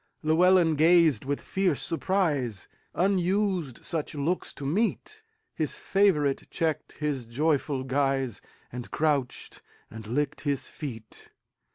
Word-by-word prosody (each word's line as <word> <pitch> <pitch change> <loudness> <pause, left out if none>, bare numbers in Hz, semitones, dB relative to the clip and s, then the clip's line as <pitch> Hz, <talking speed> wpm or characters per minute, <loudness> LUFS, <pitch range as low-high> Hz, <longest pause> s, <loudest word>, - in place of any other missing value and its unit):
Llewelyn 170 +1 +4
gazed 160 -6 +4
with 140 +1 -1
fierce 185 -8 0
surprise; 150 - -1 0.3
Unused 185 - 0
such 155 -2 -3
looks 155 +6 -1
to 140 - -8
meet, 205 +11 -1 0.3
His 155 -3 -2
favorite 160 -9 +1
checked 160 -3 -2
his 145 -6 -3
joyful 140 +1 0
guise, 135 -3 0 0.3
And 125 0 -7
crouched 145 -5 -1 0.3
and 110 -1 -9
licked 145 +5 -1
his 140 -3 -2
feet. 115 -7 -8
150 Hz, 110 wpm, -27 LUFS, 135-175 Hz, 0.3 s, Llewelyn